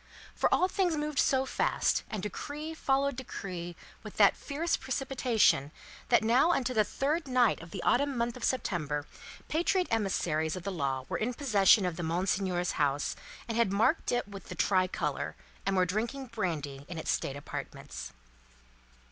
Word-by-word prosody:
For, - - +1
all 365 - +4
things 365 -4 +1
moved 300 -1 -1
so 265 -1 +3
fast, - - +1
and 210 -4 -4
decree 295 - -5
followed 275 -3 +1
decree 180 -8 -6 0.3
with - - -10
that - - +6
fierce 315 +4 -1
precipitation, 255 - +1 0.4
that 235 - +5
now 245 +8 +4
upon 270 - +1
the 245 -4 +2
third 290 +8 -1
night 250 -7 +3
of 165 - -10
the - - -6
autumn 280 0 +2
month 235 0 -1
of 250 - -9
September, 155 - -1 0.4
patriot 355 +3 +1
emissaries 170 -8 0
of 185 - -6
the 200 - -3
law 135 -6 -2
were - - -2
in 240 +3 -1
possession 205 -7 +5
of 175 -1 -2
Monseigneur's 180 +1 0
house, 145 0 +1 0.3
and 230 - -3
had 235 -4 +2
marked 225 +11 +2
it 245 -4 0
with 200 -2 -10
the - - -5
tri 185 -2 +3
colour, - - -3 0.3
and 195 - +2
were 185 -1 +4
drinking 230 +9 -2
brandy 150 -10 -3
in 175 - -6
its 160 - -1
state 135 - -1
apartments. 65 - -7
215 Hz, 165 wpm, -30 LUFS, 175-270 Hz, 0.4 s, that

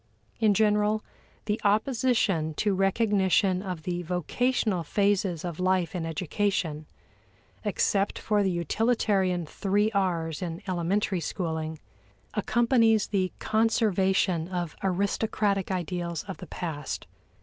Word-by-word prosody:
In 215 -3 +4
general, 210 0 +2 0.4
the 215 +1 -1
opposition 210 - +1
to 205 +3 +1
recognition 195 -1 +2
of 180 -5 -5
the 175 +1 -2
vocational 185 - 0
phases 195 -1 +1
of 170 -2 -5
life 185 -1 +1
in 170 -3 -3
education 165 -2 -1 0.8
(except 200 -1 +1
for 210 -1 +1
the 195 - +2
utilitarian 190 0 +1
three 205 +6 0
R's 170 -6 -1
in 175 +2 -5
elementary 185 +2 0
schooling) 160 -3 -3 0.6
accompanies 230 -3 +3
the 190 -3 0
conservation 195 -6 +2
of 175 -3 -3
aristocratic 200 +1 0
ideals 175 -2 -3
of 190 -1 -7
the 180 - -9
past. 150 -4 -5
190 Hz, 110 wpm, -27 LUFS, 175-210 Hz, 0.8 s, In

